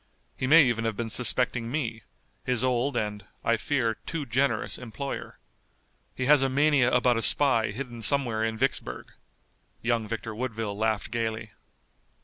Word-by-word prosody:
He 130 - -3
may 160 +3 +8
even 120 -3 0
have 110 -2 -2
been 115 -1 -3
suspecting 120 -1 +3
me, 120 -5 -3 0.4
his 125 -1 0
old, 130 +1 0
and, 105 -2 -3 0.2
I 115 - +3
fear, 115 -3 -1
too 160 -3 -3
generous 135 +3 -1
employer. 130 +3 -6 0.8
He 130 - -2
has 145 0 +5
a 135 - +2
mania 140 -2 +3
about 125 -1 +3
a - - -1
spy 115 -4 +4
hidden 120 +1 -7
somewhere 120 -4 +1
in 110 0 -2
Vicksburg." 120 - -3 0.7
Young 115 -2 0
Victor 115 0 -5
Woodville 110 -3 -4
laughed 110 0 -1
gayly. 110 -2 -3
120 Hz, 150 wpm, -27 LUFS, 110-130 Hz, 0.8 s, may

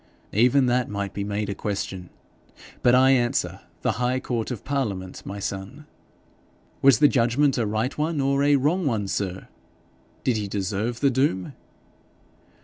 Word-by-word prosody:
'Even 125 +5 +4
that 125 0 +1
might 100 -1 -4
be 100 - -3
made 105 +1 -2
a 100 - -2
question; 95 -3 -4 0.7
but 125 0 +5
I 130 +1 +6
answer, 120 -2 +1 0.2
the - - +2
High 125 +1 +1
Court 120 -3 -3
of 125 -6 -5
Parliament, 105 -10 -3
my 100 - -5
son.' 100 +8 -6 1.0
'Was 135 -4 +6
the 145 - +6
judgment 135 +2 +2
a 115 - 0
right 110 +5 -1
one 155 0 -1
or 140 0 +1
a 145 0 +4
wrong, 140 - +1
sir? 95 -1 -3 0.8
Did 120 -3 +1
he 105 -1 -3
deserve 105 +4 -2
the 140 -1 +4
doom?' 125 -8 0
120 Hz, 150 wpm, -24 LUFS, 100-135 Hz, 1.0 s, I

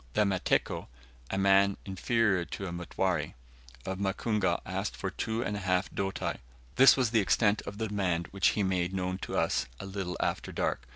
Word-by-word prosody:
The - - +3
Mateko 95 -2 0 0.4
(a 95 - -2
man 100 0 +4
inferior 100 0 +1
to 100 - -6
a 90 - -4
Mutware) 90 +1 -1 0.5
of 95 0 -3
Mukungu 100 +1 0
asked - - -3
for - - -3
two 110 +1 -2
and 105 +2 -2
a - - -3
half 90 -1 0
doti. 95 0 -2 0.4
This 135 +1 +8
was 125 -4 +1
the 115 - +4
extent 105 +1 +2
of 100 - -6
the 110 0 -1
demand, 90 -5 0
which 100 0 +2
he 105 - +2
made 95 -1 0
known 90 0 -2
to - - -4
us - - +1
a - - -6
little 95 -2 -4
after - - -1
dark. 60 - -2
95 Hz, 185 wpm, -30 LUFS, 95-105 Hz, 0.5 s, This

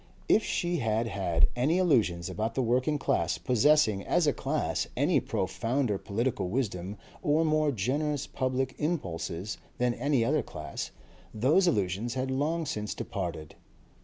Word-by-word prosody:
If 220 - +4
she 175 -1 -1
had 115 -3 0
had 90 -5 +2
any 140 +8 +2
illusions 115 - +2
about 110 +1 -3
the 130 - +1
working 130 +5 +1
class - - 0
possessing 125 -5 +3
as - - +2
a - - +3
class - - -1
any - - +3
profounder 115 +2 -1
political 110 -3 -1
wisdom 100 -4 -2 0.2
or 160 -1 +2
more 155 -1 +2
generous 140 +6 -1
public 130 0 -1
impulses 95 - -3 0.2
than 125 -1 +1
any 130 -1 +1
other 150 +4 +2
class, 75 -2 -6 0.5
those 145 - +4
illusions 105 - 0
had 130 0 -1
long 155 +5 0
since 105 -6 -3
departed. 85 -5 -5
125 Hz, 140 wpm, -29 LUFS, 100-145 Hz, 0.5 s, If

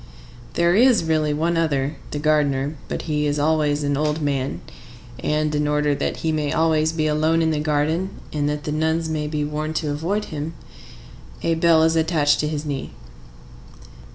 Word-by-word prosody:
There 170 0 +3
is 240 -3 +5
really 155 -2 +1
one 165 +3 0
other,—the 145 -3 -2
gardener. 145 -1 +1
But - - -4
he 150 -2 0
is 145 0 0
always 150 -1 +1
an 145 0 0
old 150 +2 0
man, 140 -3 -2 0.6
and, 150 0 0
in 150 0 0
order 150 0 +1
that - - -2
he 160 - +2
may 150 -2 -1
always 160 -1 +2
be 160 -1 -1
alone 155 +2 +2
in 160 - +2
the 155 - 0
garden, 155 +4 0 0.2
and 145 -1 0
that 150 0 -3
the 150 - -3
nuns 160 +2 0
may 150 -1 -2
be 150 -1 -2
warned 155 +1 -3
to 155 -2 -1
avoid 175 +9 -1
him, 155 +2 -4 0.9
a 165 - +2
bell 165 -1 +4
is 160 0 +3
attached 160 -3 +2
to 150 - 0
his 150 0 -3
knee. 140 -2 -4
155 Hz, 180 wpm, -22 LUFS, 150-160 Hz, 0.9 s, is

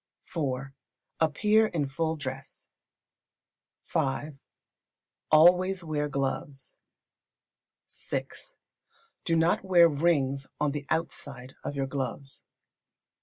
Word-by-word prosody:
iv. 135 -4 -2 0.5
Appear 210 +8 +3
in 155 -8 -1
full 160 +4 -1
dress. 135 -2 -7 1.1
v. 140 +3 -1 1.0
Always 180 +4 +5
wear 150 -2 -2
gloves. 135 0 -3 1.3
vi. - - 0 1.0
Do 165 - +2
not 165 +3 +2
wear 175 -3 +6
rings 140 -4 +1
on 150 -1 +1
the 145 0 -5
outside 135 -5 -3
of 145 - -4
your 135 -1 -1
gloves. 135 0 -5
145 Hz, 90 wpm, -28 LUFS, 135-165 Hz, 1.3 s, wear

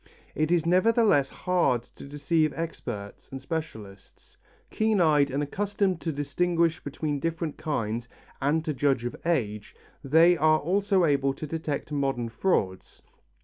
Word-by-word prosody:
It 155 0 0
is 170 -2 +2
nevertheless 185 - +3
hard 175 -10 0
to - - -14
deceive 150 +2 0
experts 105 -11 -6
and 135 - -6
specialists. 110 - -8 0.4
Keen 220 -2 +1
eyed 150 -4 +4
and 140 +2 -1
accustomed 195 +2 -1
to 165 - -2
distinguish 165 +4 0
between 145 0 -3
different 165 0 -3
kinds, 115 -6 -2 0.3
and 155 +4 +1
to 155 - -1
judge 135 -3 +1
of 120 - -3
age, 105 -11 -1 0.3
they 165 +5 +5
are 155 0 +4
also 190 +4 +1
able 140 -2 +1
to 155 - -6
detect 155 -2 -4
modern 135 -5 -1
frauds. 110 - -2
155 Hz, 140 wpm, -27 LUFS, 135-170 Hz, 0.4 s, they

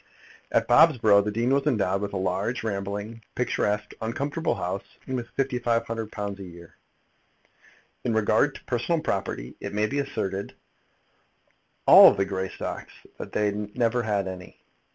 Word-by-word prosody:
At - - +2
Bobsborough 120 -7 +6
the 105 - -2
dean 115 +5 0
was 140 +1 +1
endowed 100 -7 +1
with 100 -1 -3
a - - -1
large, 95 +6 -1
rambling, 105 +2 -4
picturesque, 105 -4 -1
uncomfortable 140 +8 -2
house, 95 +2 -5
and 130 - -3
with 120 -2 -4
£1,500 115 -5 -2
a - - -7
year. 85 -2 -13 1.3
In 115 -2 0
regard 110 +6 +2
to - - -11
personal 130 +7 0
property 95 - -3
it - - -6
may 105 +1 +2
be 140 +6 -2
asserted 100 -7 -3
of - - -34 1.3
all - - +10
the 100 - +1
Greystocks 95 -1 -5
that - - -7
they 105 -1 +1
never 115 +4 -1
had 105 -4 -1
any. 90 -1 -9
105 Hz, 145 wpm, -26 LUFS, 100-120 Hz, 1.3 s, all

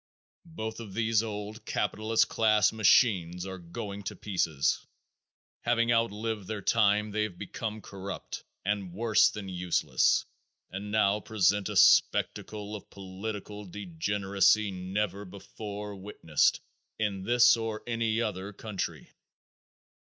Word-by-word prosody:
Both 110 -3 -4
of 105 -5 -9
these 115 -1 +2
old 105 0 -6
capitalist 110 +2 +1
class 110 -2 +3
machines 95 -5 +3
are 95 -1 -6
going 100 +4 -6
to - - -4
pieces. 85 -8 0 0.8
Having 120 0 +1
outlived 110 -3 0
their 105 -2 -4
time 105 -1 +3
they 105 +1 -1
have 105 -5 -3
become 105 +3 -5
corrupt 100 0 -7 0.2
and 100 -3 -1
worse 110 +2 +4
than 105 -2 -7
useless 90 -1 +1 0.5
and 100 +2 -6
now 105 -1 +3
present 105 -2 +1
a - - -4
spectacle 105 0 +3
of 105 - -10
political 100 +2 -7
degeneracy 100 +2 +1
never 95 +2 -3
before 105 +2 -8
witnessed 95 -6 +1 0.4
in 105 -3 -1
this 120 +3 +6
or 115 -2 -4
any 115 -1 0
other 100 -2 -4
country. 105 -1 -5
105 Hz, 120 wpm, -29 LUFS, 95-110 Hz, 0.8 s, this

